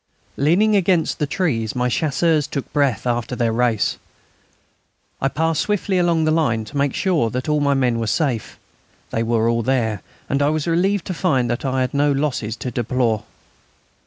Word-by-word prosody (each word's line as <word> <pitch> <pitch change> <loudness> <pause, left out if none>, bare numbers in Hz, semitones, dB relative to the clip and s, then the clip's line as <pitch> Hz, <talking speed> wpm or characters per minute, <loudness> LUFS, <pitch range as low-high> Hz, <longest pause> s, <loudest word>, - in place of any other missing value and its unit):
Leaning 185 +10 +3
against 180 -4 +1
the 150 - 0
trees, 140 - -1
my 125 0 +1
Chasseurs 155 +3 +1
took 140 -2 -5
breath 140 -7 +1
after 120 0 -1
their 115 -2 0
race. 115 -2 +1 1.2
I 135 - +2
passed 160 +2 0
swiftly 200 -2 0
along 170 -2 +2
the 155 - +2
line 120 -9 +1
to 145 - -12
make 140 -1 0
sure 170 - +1
that 125 +5 -4
all 150 -1 +2
my 140 -1 +2
men 125 -3 +1
were 115 - -2
safe. 120 -1 -1 0.5
They 115 - -1
were 115 0 +1
all 115 0 +1
there, 115 -4 0 0.3
and 140 +1 0
I 145 - +3
was 155 -1 -1
relieved 180 +4 +1
to 185 - -3
find 135 -9 +1
that 120 - -3
I 130 0 0
had 130 -1 -1
no 145 +1 +2
losses 135 -6 -1
to 125 - -5
deplore. 120 -2 0
140 Hz, 185 wpm, -21 LUFS, 120-160 Hz, 1.2 s, Leaning